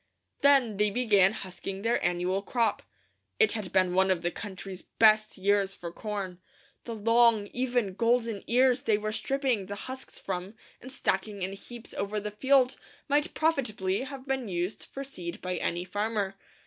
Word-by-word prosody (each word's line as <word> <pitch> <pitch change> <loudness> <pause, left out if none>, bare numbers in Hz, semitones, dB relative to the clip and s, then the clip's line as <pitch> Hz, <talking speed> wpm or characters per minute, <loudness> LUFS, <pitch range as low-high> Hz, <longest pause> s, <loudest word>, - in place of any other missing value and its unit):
Then 270 -7 +4
they 210 +1 +3
began 205 -4 +4
husking 195 -1 -6
their 235 +1 +1
annual 180 +2 0
crop. 230 +1 0 0.6
It 440 - +6
had 210 -5 -4
been 185 -1 +3
one 190 +1 +3
of 185 -2 +1
the 175 - 0
country's 190 -2 -7
best 215 -1 +3
years 195 0 +2
for 170 -1 -7
corn. 195 -2 -5 0.4
The 230 - -5
long, 230 0 +4
even, 245 -5 0
golden 230 -1 +1
ears 250 +1 +4
they 215 -3 +2
were 215 0 -3
stripping 260 -5 0
the 205 - -5
husks 260 0 -7
from 190 +2 -5 0.3
and 260 - -9
stacking 200 -5 -1
in 190 +1 -2
heaps 235 +4 -9
over 205 +1 -2
the 210 0 -5
field 260 +4 +3 0.3
might 295 +1 +1
profitably 220 -12 0
have 270 0 -7
been 265 -3 -1
used 180 +2 -3
for 275 - -7
seed 185 -8 -7
by 180 -1 -3
any 175 +2 -2
farmer. 205 0 -2
210 Hz, 165 wpm, -29 LUFS, 190-245 Hz, 0.6 s, It